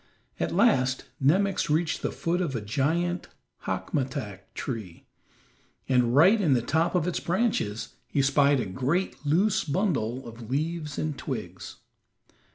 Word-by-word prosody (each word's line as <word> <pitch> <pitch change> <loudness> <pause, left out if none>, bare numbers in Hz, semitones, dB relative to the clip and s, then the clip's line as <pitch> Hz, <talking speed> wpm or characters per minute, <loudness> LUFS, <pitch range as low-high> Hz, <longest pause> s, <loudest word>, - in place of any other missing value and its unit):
At - - -1
last 150 - +3 0.2
Nemox 190 +5 +2
reached 160 +2 +1
the - - -1
foot 175 +2 -1
of 155 -7 -2
a 115 - -2
giant 160 - 0 0.4
hackmatack 130 - -3
tree, 110 -10 -6 0.8
and 125 -2 +3
right 190 +9 +6
in 150 -8 +3
the 120 - +2
top 165 +6 +1
of 175 -1 +1
its 180 - -1
branches 175 - -1 0.2
he 140 - +1
spied 140 0 +4
a 120 - -1
great 140 - -1
loose 195 +8 +3
bundle 140 - -1
of 115 -1 -10
leaves 155 +1 -2
and 155 -2 -2
twigs. - - -6
145 Hz, 140 wpm, -27 LUFS, 125-175 Hz, 0.8 s, right